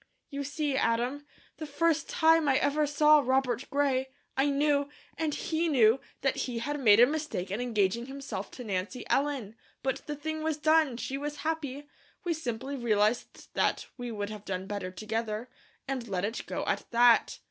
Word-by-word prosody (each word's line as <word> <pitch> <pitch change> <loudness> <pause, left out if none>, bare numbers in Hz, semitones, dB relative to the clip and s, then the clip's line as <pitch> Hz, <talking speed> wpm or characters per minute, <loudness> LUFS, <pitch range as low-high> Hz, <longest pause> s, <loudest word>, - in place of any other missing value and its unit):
"You 280 0 -3
see 290 0 -2
Adam, 255 +3 0 0.3
the 310 - -6
first 315 +2 +1
time 320 -2 +4
I 265 - +4
ever 295 +1 +1
saw 300 +1 +5
Robert 260 -1 +1
Gray, 270 -2 +1 0.3
I 270 +2 +2
knew, 285 0 +2 0.3
and 315 -2 -1
he 330 +1 -1
knew, 245 -5 +5 0.2
that 270 -1 +1
he 245 -2 -2
had 290 +5 -2
made 215 -5 +6
a 240 - +9
mistake 295 - -3
in 210 +5 -2
engaging 230 -1 0
himself 275 +1 -6
to 250 - -8
Nancy 205 +4 -3
Ellen; 270 -7 0 0.3
but 265 -1 0
the 295 - -3
thing 315 +2 -4
was 315 -1 -1
done, 310 -4 +3
she 270 +2 -4
was 295 +1 -4
happy, 290 -3 -3 0.4
we 350 -2 0
simply 265 -3 -4
realized 220 -2 0
that - - +1
we 245 -1 -5
would 205 -1 -4
have 210 -2 -8
done 185 -2 -4
better 200 -2 -4
together, 220 +4 -4 0.4
and 260 -3 -3
let 190 -2 -1
it 220 +3 -4
go - - -3
at - - -2
that. 240 0 +4
270 Hz, 180 wpm, -29 LUFS, 230-295 Hz, 0.4 s, a